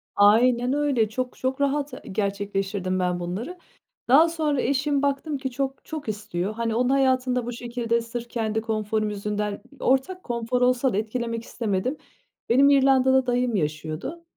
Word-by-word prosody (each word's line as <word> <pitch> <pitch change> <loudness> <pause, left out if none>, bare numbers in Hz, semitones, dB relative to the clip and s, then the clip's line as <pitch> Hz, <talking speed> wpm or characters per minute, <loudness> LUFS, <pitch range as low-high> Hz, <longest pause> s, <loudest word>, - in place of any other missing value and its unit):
Aynen 240 +5 +4
öyle, 275 -7 +1
çok 255 +2 -4
çok 265 +2 -2
rahat 280 0 0
ı - - -8
gerçekleştirdim 195 -2 -2
ben 180 -1 0
bunları. 205 - -5 0.5
Daha 310 +7 +6
sonra 305 -5 0
eşim, 280 +2 +1
baktım 285 +1 -1
ki 265 -1 -4
çok, 270 +1 -3
çok 305 -7 -6
istiyor. 205 -2 -3
Hani, 230 0 -2
onun 250 +1 +2
hayatını 260 -2 +2
da 245 -2 -1
bu 245 - -4
şekilde, 235 -1 -1
sırf 235 +1 -6
kendi 220 -1 -1
konforum 215 -1 -1
yüzünden, 210 0 -3 0.2
ortak 270 +9 +1
konfor 240 +1 -2
olsa 250 0 +3
da - - 0
etkilemek 230 +1 -2
istemedim. 230 +6 -2 0.5
Benim 275 +4 +6
İrlanda'da 265 -1 +4
dayım 245 -1 +1
yaşıyordu. 155 - -3
240 Hz, 155 wpm, -25 LUFS, 210-270 Hz, 0.5 s, Daha